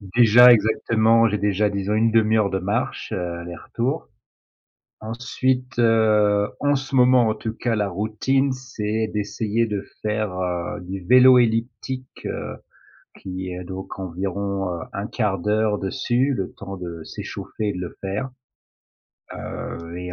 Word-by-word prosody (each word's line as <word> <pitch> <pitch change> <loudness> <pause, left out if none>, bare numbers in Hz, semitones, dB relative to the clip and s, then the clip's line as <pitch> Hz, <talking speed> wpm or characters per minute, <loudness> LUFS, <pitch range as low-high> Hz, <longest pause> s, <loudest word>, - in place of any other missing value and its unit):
déjà 120 +1 +8
exactement, 115 +1 +3
j'ai 105 -1 0
déjà, 105 +1 +1
disons, 100 +1 -2
1/2 110 0 +3
heure 100 -2 +2
de 95 - -1
marche, 105 +5 -2
heu, 100 - -2 0.2
aller-retour. 115 - -4 0.9
Ensuite, 125 +2 -2
heu, 105 -3 +3
en 145 0 +2
ce 135 0 -6
moment, 125 -2 +5
en 110 - 0
tout 110 +1 -5
cas, 115 0 -1
la 105 -1 0
routine, 110 +8 0
c'est 110 -4 -3
d'essayer 105 +2 -1
de 105 -3 -3 0.2
faire, 105 -2 -1
heu, 90 +3 -3
du 95 0 -6
vélo 125 +1 +7
elliptique, 120 +2 -2
heu, - - -5 0.6
qui 95 0 -6
est 90 0 -6
donc 95 +2 -7
environ, 95 +1 -3
heu, 85 - -4
1/4 100 0 -1
d'heure 105 +1 +1
dessus, 120 +7 0
le 95 -2 -3
temps 100 0 -8
de 85 -3 -7
s'échauffer 105 +5 -5
et - - -2
de 90 - -6
le 90 - -6
faire. 100 +8 -3 1.0
Heu 85 +1 -7
et 90 0 -6
105 Hz, 145 wpm, -23 LUFS, 95-120 Hz, 1.0 s, déjà